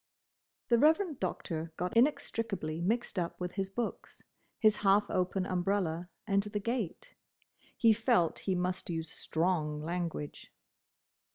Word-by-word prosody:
The 235 -1 +5
Reverend 315 - +3
Doctor 165 -3 -3
got 180 +5 -2
inextricably 225 - +1
mixed 215 +1 0
up 170 -1 -3
with 180 -1 -3
his 195 0 -2
books, 230 +3 -5 0.3
his 215 -1 +4
half 200 +1 +4
open 185 +1 0
umbrella, 180 -2 0 0.2
and 200 -2 +3
the 210 +1 -3
gate. 235 - -3 0.6
He 225 -2 +6
felt 220 -6 +2
he 185 - +3
must 180 +1 -2
use 165 -1 -3
strong 160 -3 -1
language. 170 -3 -4
190 Hz, 125 wpm, -32 LUFS, 170-225 Hz, 0.6 s, He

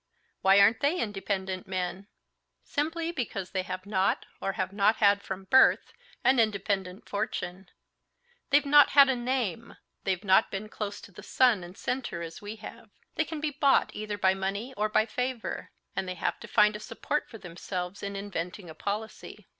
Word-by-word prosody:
"Why 195 +1 +6
aren't 215 +3 +5
they 305 +6 +1
independent 195 -3 -3
men?" 185 +1 -3 0.6
"Simply 325 +3 -2
because 205 - -4
they 190 - 0
have 185 0 -6
not, 195 -2 +1 0.2
or 195 - -1
have 185 0 -3
not 205 +2 +3
had 200 -1 +4
from 190 -1 -6
birth, 260 +7 +4 0.3
an 260 -1 +4
independent 200 -3 -1
fortune; 185 -2 -4 0.8
they've 285 +1 +4
not 290 +1 +7
had 280 -1 +9
a 265 - +2
name, 240 -3 -2 0.3
they've 190 0 -1
not 190 +2 +4
been 210 +2 -5
close 205 -2 -5
to - - -13
the 180 - -12
sun 240 -8 +3
and 175 +2 -11
center 250 -10 -3
as 165 0 -8
we 205 +1 -6
have. 225 +1 -11 0.2
They 320 - 0
can 320 -1 -5
be 305 -1 -1
bought 280 -1 +3
either 210 -1 -4
by 190 -1 +3
money 200 +6 -3
or 215 +1 0
by 215 0 +3
favor. 250 +1 -3 0.3
And 190 - -2
they 185 - -4
have - - -2
to - - -10
find 210 0 +4
a - - -5
support 300 +7 -3
for 225 - -9
themselves 180 0 -6
in 200 0 -4
inventing 190 -2 -5
a - - -9
policy. 210 +6 -5
205 Hz, 180 wpm, -28 LUFS, 190-235 Hz, 0.8 s, had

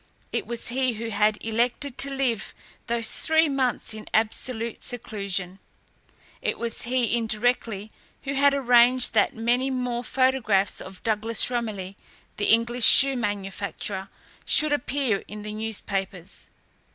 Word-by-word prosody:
It - - -3
was 235 -1 +1
he 255 0 0
who 225 +1 -5
had 210 +1 +2
elected 240 +4 -1
to 275 - +3
live 265 -5 -2 0.3
those 230 -1 +1
three 320 0 +3
months 260 -5 -1
in 215 0 -10
absolute 225 +1 -1
seclusion. 200 -6 -4 0.8
It - - -2
was 235 -1 -2
he, 240 -2 0
indirectly, 220 -2 -1 0.3
who 275 0 -3
had 280 0 +3
arranged 245 -1 +4
that - - +2
many 240 +4 0
more 250 -2 -3
photographs 250 -7 +1
of 185 0 -12
Douglas 225 +2 +1
Romilly, 210 -6 -4 0.4
the 205 - -1
English 235 +2 +2
shoe 275 0 +8
manufacturer, 200 -3 -4 0.4
should 305 -1 +4
appear 265 -6 -1
in 210 0 -9
the 210 0 -6
newspapers. 200 -4 -3
230 Hz, 130 wpm, -25 LUFS, 210-255 Hz, 0.8 s, shoe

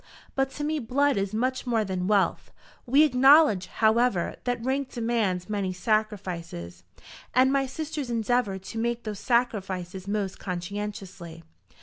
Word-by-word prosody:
But 270 0 +1
to 295 - -5
me 310 +1 0
blood 280 +3 +1
is 195 0 -1
much 255 +4 -1
more 225 -3 +1
than 185 -1 -2
wealth. 205 -2 +1 0.4
We 275 +5 +6
acknowledge, 270 - +5
however, 220 -4 +2
that 245 -1 -2
rank 265 0 -1
demands 225 -7 -1
many 200 -3 -2
sacrifices, 180 - -2 0.5
and 260 +2 +5
my 275 -1 +1
sisters 295 -1 -5
endeavour 230 -3 0
to 190 +4 -7
make 235 +1 -1
those 210 -2 -5
sacrifices 195 -6 -1
most 200 -2 -2
conscientiously. 180 -2 -6
220 Hz, 135 wpm, -26 LUFS, 190-250 Hz, 0.5 s, We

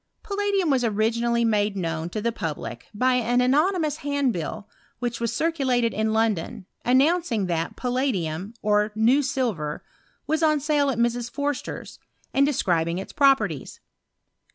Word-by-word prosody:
Palladium 400 -5 0
was 260 -2 +2
originally 235 +2 +1
made 210 -2 +1
known 165 -2 -2
to 215 +4 -4
the 235 - +1
fiublic 150 - -5
by 255 +4 +2
an 245 0 +2
anonymous 305 +4 +2
handbill 245 - -2 0.3
which 240 -1 -3
was 235 -1 0
circa 325 +5 -1
ated 245 -2 +2
in 220 +1 0
London, 220 -5 0 0.2
announcing 265 - +2
that 165 -2 -2
palladium, 220 - -2
or 210 0 +2
new 235 +6 +4
silver, 230 - -2 0.4
was 315 +2 0
on 305 -2 +3
sale 290 -1 +1
at 260 - -1
Mrs. 240 0 0
Forster's, 285 +2 -4 0.3
and 275 +1 +4
describing 170 - 0
its 190 - -7
properties. 225 - +2
235 Hz, 140 wpm, -24 LUFS, 210-280 Hz, 0.4 s, new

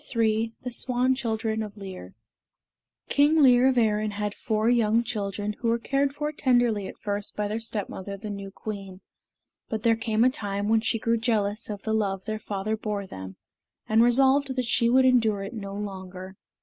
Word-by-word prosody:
III 225 0 +2
THE 250 - -4
SWAN 250 +1 +1
CHILDREN 220 -3 -2
OF 210 -1 -7
LIR 185 - -9 0.9
King 295 +3 +4
Lir 250 -1 +6
of 260 -1 +2
Erin 215 -2 +2
had 205 0 -3
four 215 +1 -1
young 230 -1 +3
children 205 -2 -3
who 235 - -2
were 230 +1 +3
cared 275 +4 0
for 300 0 -2
tenderly 240 -8 +2
at - - -10
first 205 0 -4
by 210 0 -1
their 215 +2 -2
stepmother, 200 -3 -4
the 210 +1 -6
new 200 -1 -6
queen; 195 -2 -7 0.7
but 220 -1 -3
there 230 -1 +4
came 225 0 +1
a 255 - +5
time 205 -5 -2
when 225 0 +4
she 225 - 0
grew 230 +1 +1
jealous 220 -1 0
of 205 -2 -6
the 220 - -1
love 195 -3 -1
their 215 -1 -3
father 210 0 -3
bore 210 -2 -3
them, 95 - -9 0.5
and 220 +1 +4
resolved 265 +3 +4
that 255 -1 -1
she 235 0 +2
would 260 +2 +5
endure 225 -6 +3
it 195 - -6
no 200 -3 -6
longer. 190 -2 -7
220 Hz, 190 wpm, -26 LUFS, 205-240 Hz, 0.9 s, Lir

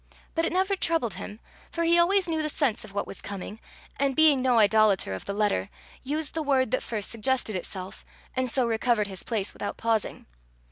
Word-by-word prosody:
But 330 0 +1
it - - -1
never 380 +2 +1
troubled 330 - 0
him, 210 - -8 0.3
for 335 - -2
he 340 +1 +5
always 375 +2 +3
knew 320 -2 0
the 305 - -2
sense 280 -7 0
of 215 - -11
what 200 - -2
was - - -7
coming, 200 +2 -7 0.4
and 275 -1 +1
being 305 -4 +5
no 250 -2 +3
idolater 210 - +4
of 95 - -6
the - - -3
letter, 200 - 0 0.3
used 300 +2 -3
the 320 - -2
word 265 -5 +2
that - - +1
first 215 -3 -3
suggested 230 -1 0
itself, 185 +1 -6 0.3
and 260 -1 0
so 255 +1 +1
recovered 230 -1 +1
his 190 -2 -6
place 210 -4 -2
without 205 - -5
pausing. 225 -3 -1
240 Hz, 200 wpm, -27 LUFS, 210-310 Hz, 0.4 s, he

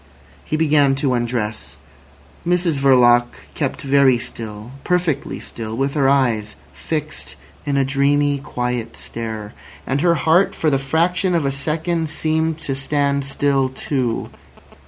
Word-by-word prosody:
He 155 - -2
began 145 -3 +3
to 135 -1 0
undress. 120 -3 -3 0.7
Mrs 175 -4 +1
Verloc 120 -3 +5 0.3
kept 145 +2 -3
very 135 -2 +4
still, 110 -1 -7
perfectly 175 -6 -1
still, 110 -1 -7
with 135 +1 0
her 140 -3 +3
eyes 115 -6 +1 0.2
fixed 155 -1 -5 0.3
in 140 -1 +1
a 135 - +3
dreamy, 140 +1 +2
quiet 125 -3 -3
stare. 110 -2 -6 0.3
And 135 +2 -1
her 170 0 +4
heart 165 +5 +3
for 155 - +1
the 135 - +2
fraction 170 +6 +1
of 165 -4 +1
a 135 - +1
second 160 +3 -2
seemed 160 +1 0
to 140 - -3
stand 140 0 0
still 140 -1 +1
too. 130 -3 -2
140 Hz, 135 wpm, -20 LUFS, 125-155 Hz, 0.7 s, Verloc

